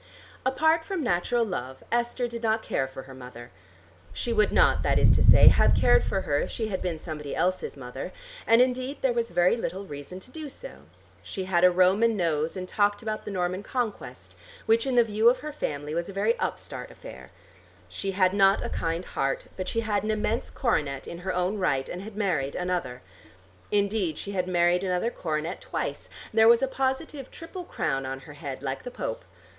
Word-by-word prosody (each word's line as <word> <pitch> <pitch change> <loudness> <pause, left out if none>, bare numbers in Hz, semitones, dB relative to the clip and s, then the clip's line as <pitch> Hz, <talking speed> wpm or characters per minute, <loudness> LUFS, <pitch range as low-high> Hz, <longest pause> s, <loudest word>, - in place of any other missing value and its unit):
Apart 315 +5 +3
from 360 -1 -3
natural 230 +4 +1
love, 130 - -5
Esther 240 +1 0
did 235 -1 -6
not 220 -1 +1
care 135 - -1
for 130 0 -9
her 135 - -12
mother. 125 -2 -11 0.6
She 235 - -2
would 215 -2 +3
not, - - +4
that - - +2
is - - +5
to - - +3
say, - - +9
have - - +4
cared - - +4
for 195 - -1
her 145 -5 0
if - - -2
she 220 -2 -3
had 190 - -3
been 175 -3 -2
somebody 155 -3 -6
else's 185 -4 -1
mother, 125 -2 -7 0.4
and 230 +2 +7
indeed 255 +2 -2
there 260 -2 +3
was 235 -1 -1
very 175 +3 +3
little 200 -4 -4
reason 145 +3 -8
to 255 - -13
do 310 -1 -7
so. - - -11 0.4
She 190 - -5
had 180 -2 +1
a 180 - +9
Roman 190 +5 +3
nose 160 -1 0
and 185 0 -5
talked 205 +3 +1
about 215 -1 -4
the - - -4
Norman 185 -1 -1
Conquest, 235 -1 -4 0.3
which 225 +3 +3
in 260 - 0
the 240 - +7
view 220 +1 +4
of 250 - +2
her 300 - -5
family 150 - -4
was 170 +2 -2
a - - -7
very 210 +4 +2
upstart - - -4
affair. 65 -1 -11 0.6
She 95 - -4
had 185 -1 +3
not 195 -1 +4
a - - -3
kind 165 +2 -2
heart, 135 0 -2
but 185 -1 -4
she 230 - 0
had 210 -2 0
an 215 - -2
immense 215 +2 -1
coronet 145 - -1
in 170 - -7
her 185 +1 -3
own 180 +4 0
right, 135 -8 +1
and 180 - -6
had 210 +1 -9
married 165 -10 0
another. 180 - -2 0.7
Indeed 200 -5 0
she 200 - -4
had 185 -2 -1
married 175 0 +2
another 185 +5 0
coronet 160 -2 -3
twice: - - -4 0.2
there 220 0 +6
was 235 +2 +6
a - - +3
positive 265 +1 -2
triple 350 +2 -8
crown 135 - -2
on 135 0 -5
her 150 +1 -12
head 140 -2 -7
like 135 -1 -3
the - - -6
Pope. - - -5
190 Hz, 205 wpm, -27 LUFS, 165-230 Hz, 0.7 s, say